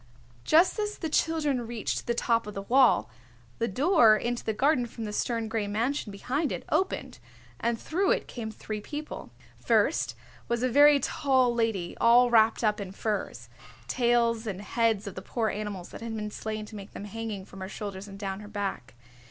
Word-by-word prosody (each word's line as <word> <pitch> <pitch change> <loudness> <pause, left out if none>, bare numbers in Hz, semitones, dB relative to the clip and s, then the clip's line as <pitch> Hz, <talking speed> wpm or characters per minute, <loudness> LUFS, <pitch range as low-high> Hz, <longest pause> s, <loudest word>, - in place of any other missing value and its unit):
Just 340 +7 +4
as 420 0 -2
the 320 - -3
children 295 -8 +1
reached 230 -2 -3
the 235 - +1
top 230 -2 +1
of 210 - -7
the 195 - -4
wall, 255 +3 +4 0.5
the 230 - +1
door 245 - +5
into 240 +2 -2
the 220 - 0
garden 255 +2 +2
from 230 0 -8
the 210 -1 -4
stern 230 0 -1
gray 220 -2 -2
mansion 230 +3 -1
behind 265 +9 -2
it - - -5
opened 380 0 -1 0.4
and 235 -1 0
through 380 +4 0
it - - +1
came 230 -3 -5
three 215 0 -6
people. 300 +7 -7 0.3
First - - +2 0.3
was 235 0 -1
a 255 - +2
very 290 +3 +7
tall 260 -3 +2
lady 225 -7 -1
all 240 +1 +6
wrapped 225 0 +4
up 210 -1 +1
in 190 -2 -6
furs, 210 +1 -3 0.4
tails 235 -2 +2
and 200 -1 -4
heads 225 -1 +1
of 200 - -6
the 185 - -7
poor 225 +2 -1
animals 205 -4 -5
that - - -10
had 230 -1 -4
been 210 -1 -4
slain 215 0 -4
to 215 - -11
make 200 0 -9
them 205 - -7
hanging 215 -2 -5
from 195 - -12
her 190 - -5
shoulders 200 -2 -6
and 195 -1 -10
down 195 -1 -4
her 210 - -10
back. 200 - -4
225 Hz, 195 wpm, -28 LUFS, 210-250 Hz, 0.5 s, very